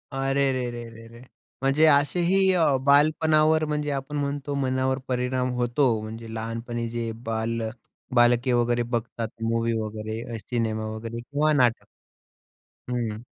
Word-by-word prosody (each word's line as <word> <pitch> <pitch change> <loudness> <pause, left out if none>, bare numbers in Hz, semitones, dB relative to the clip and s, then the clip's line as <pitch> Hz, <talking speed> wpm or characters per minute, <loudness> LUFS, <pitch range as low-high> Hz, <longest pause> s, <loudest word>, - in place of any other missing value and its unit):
अरे 135 0 +1
रे 125 -1 -2
रे 120 0 -6
रे 115 0 -13
रे! 115 +1 -14 0.4
म्हणजे 135 +4 +4
असेही 170 +5 +3 0.2
अ, 160 -6 +3
बालपणावर 155 +2 +4
म्हणजे 150 -1 -2
आपण 140 +1 -4
म्हणतो, 145 0 -2
मनावर 130 0 0
परिणाम 125 0 0
होतो. 125 +2 +2
म्हणजे 110 +1 -8
लहानपणी 115 +1 -4
जे 115 -1 -3
बाल 115 +1 -2 0.5
बालके 120 +1 +4
वगैरे 120 0 +2
बघतात 115 0 -3 0.2
मूवी 115 0 0
वगैरे, 110 +2 -5
सिनेमा 110 -1 -2
वगैरे 115 +1 -6
किंवा 145 +5 0
नाटक 125 -5 +2 1.0
हं. 120 -4 -2
125 Hz, 130 wpm, -25 LUFS, 115-140 Hz, 1.0 s, म्हणजे